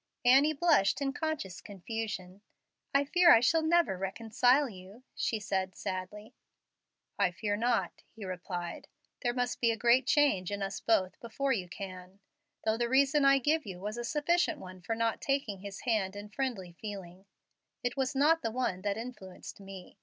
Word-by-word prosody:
Annie 275 +5 +6
blushed, 295 - +3
in 275 -1 -1
conscious 305 - -4
confusion. 200 -2 -6 0.5
"I 280 +1 +3
fear 350 +4 +6
I - - +8
shall 320 +8 +3
never 325 - +3
reconcile 245 +8 +2
you," 195 +2 -12
she 220 - -1
said, 190 -2 -2
sadly. 190 +3 -6 0.9
"I - - +4
fear 205 +3 -2
not," 240 +3 0
he 220 -3 -8
replied. 180 -2 -5 0.3
"There 245 - +1
must 245 0 -2
be 235 - +4
a 225 - 0
great 240 +3 +4
change 275 - +3
in 205 -1 -3
us 195 +2 -4
both 195 -5 +1
before 270 +4 -2
you 190 -8 -1
can. 185 +1 -9 0.5
Though 220 0 +2
the 240 0 0
reason 275 +2 +4
I 275 0 +6
give 300 +4 +1
you 185 -6 -8
was 210 +3 -4
a - - -3
sufficient 315 +5 +1
one 185 -6 -11
for 225 +6 -2
not 230 0 -1
taking 275 -8 -1
his 200 0 -8
hand 210 -6 0
in 205 +1 -8
friendly 215 -7 -3
feeling, 190 -1 -9 0.6
it 245 0 -1
was 265 0 -1
not 315 +4 +4
the 225 - -1
one 220 -6 -2
that 200 +1 -1
influenced 210 -7 -9
me. 195 -1 -11
225 Hz, 175 wpm, -31 LUFS, 190-270 Hz, 0.9 s, I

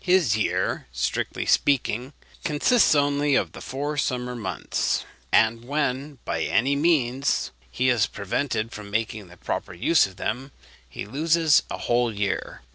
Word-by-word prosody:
His 180 - +3
year, 110 - -1
strictly - - -2
speaking, 130 -1 +1 0.3
consists 155 +6 +3
only 145 0 +2
of - - +1
the - - -10
four 145 +3 -4
summer 125 -3 -1
months; 105 -6 -2 0.3
and 115 +1 +3
when 140 +1 -2
by - - -2
any 135 +5 +2
means 140 -4 +1 0.2
he 125 - 0
is 115 -5 +3
prevented 110 +2 -2
from 105 -1 -8
making 110 -1 -2
the 90 0 -15
proper 90 - -4
use 145 - +3
of 95 - -14
them, 130 +8 -4 0.4
he - - -6
loses 155 +6 +3
a - - -4
whole 120 -1 +1
year. 100 - -3
130 Hz, 145 wpm, -25 LUFS, 110-145 Hz, 0.4 s, His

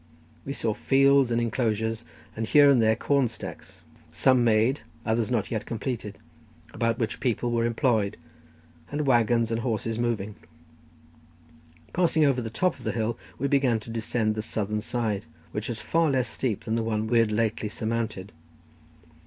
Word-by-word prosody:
We 140 - -3
saw 110 -5 -1
fields 135 +1 +4
and 115 - +2
inclosures, 115 -1 -1 0.3
and 110 0 -3
here 145 +1 +7
and 130 -4 +4
there 110 0 +4
corn 140 +2 +2
stacks, - - -10 0.3
some 130 -2 +3
made, 115 +4 +3 0.3
and 110 - 0
others 115 0 +1
not 120 -5 -1
yet 110 -2 -3
completed, 110 -2 -4 0.6
about 115 0 0
which 115 -3 -2
people 120 -1 0
were 115 0 +1
employed, 115 -4 +1 0.7
and 150 0 -1
waggons 115 -2 +3
and 115 0 -1
horses 115 -1 -2
moving. 105 -4 -2 1.6
Passing 165 -3 +3
over 135 -3 +2
the 115 - -4
top 180 +11 0
of - - -12
the - - -2
hill, 115 0 -1 0.2
we 140 - -1
began 135 -5 +2
to 110 +1 -10
descend 110 -1 0
the 110 - -3
southern 105 -1 -2
side, 115 -3 -2 0.3
which 105 +3 -4
was 115 - -3
far 165 -1 +1
less 130 -3 +1
steep 115 -7 -2
than 110 - -3
the 115 - +1
one 110 -1 -1
we 115 +1 +3
had 115 -2 +2
lately 110 0 0
surmounted. 110 -3 -3
115 Hz, 170 wpm, -26 LUFS, 110-125 Hz, 1.6 s, here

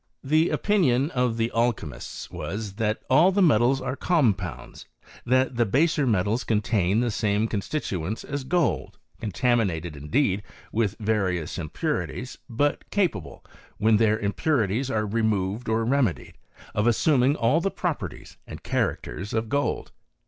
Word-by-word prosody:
The 155 +4 +3
opinion 150 - +2
of 125 -3 0
the 115 0 0
alchymists 115 - -2
was, 95 +5 -5
that 110 -1 -1
all 160 +8 +5
the 195 +1 +3
me 160 -8 +6
* - - 0
tals 130 +3 +3
are 130 0 -2
compounds; 100 - -1 0.4
that 130 0 +2
the 120 - +3
baser 150 - +2
metals 105 +2 +1
contain 105 -2 +1
the 120 -1 0
same 105 +1 +1
constituents 100 - -3
as 140 -1 -4
gold, 130 - 0 0.2
contaminated, 95 -6 0
indeed, 95 - 0 0.3
with 110 -2 0
various 95 -7 -1
impurities, 80 -4 -3
but 145 +6 -1
capable, 195 -4 -2 0.3
when 110 +1 +4
their 110 0 +3
im. 100 -2 -2
purities 125 -4 0
are 110 -4 0
removed 105 0 -1
or 110 0 +1
remedied, 120 - 0 0.4
of 105 +2 +1
assuming 130 +3 +3
all 145 +6 +2
the 195 - +1
properties 165 - -4
and - - -9
characters 100 +4 -2
of 110 0 -1
gold. 140 +3 -1
115 Hz, 140 wpm, -25 LUFS, 100-135 Hz, 0.4 s, me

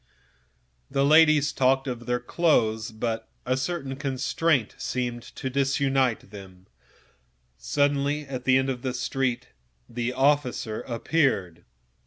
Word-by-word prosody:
The 135 0 +1
ladies 155 -1 +5
talked 135 +1 +2
of 120 -3 -5
dress, 120 -3 +1
but 115 0 -4 0.2
a 130 - +1
certain 135 -1 -3
constraint 135 -1 0
seemed 120 -1 -3
to 130 - -4
prevail 140 +1 +1
among 130 -4 +3 0.2
them. 95 -3 -12 0.9
Suddenly, 140 - +1
at 130 -2 -6
the 130 0 +5
end 130 0 +1
of 125 -2 -5
the 130 -1 -3
street, 125 -1 -2 0.4
the 120 +1 -3
officer 130 -4 0
appeared. 115 - 0
130 Hz, 120 wpm, -26 LUFS, 120-140 Hz, 0.9 s, ladies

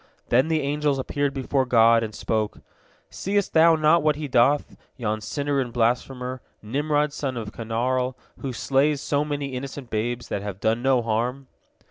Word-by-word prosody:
Then 130 +5 +4
the 160 -1 +1
angels 145 0 0
appeared 145 +1 -1
before 135 0 0
God, 115 -2 +5
and 110 -1 -5
spoke, 110 -2 -1 0.5
"Seest 200 0 -1
Thou 165 0 +6
not 155 +2 +4
what 150 -1 +2
he 150 0 -4
doth, 135 +3 +2 0.2
yon 110 -3 -2
sinner 140 +5 -1
and 125 -3 -2
blasphemer, 125 +2 -1 0.2
Nimrod 145 +5 0
son 135 -4 -3
of 110 -3 -5
Canaarl, 125 +3 -1 0.2
who 135 - -4
slays 140 +4 +1
so 145 +1 0
many 145 -2 -3
innocent 135 0 -6
babes 120 +2 -2
that 100 - -2
have 100 -2 -6
done 110 +3 +1
no 130 -2 +3
harm?" 120 +4 -2
130 Hz, 165 wpm, -24 LUFS, 115-145 Hz, 0.5 s, Thou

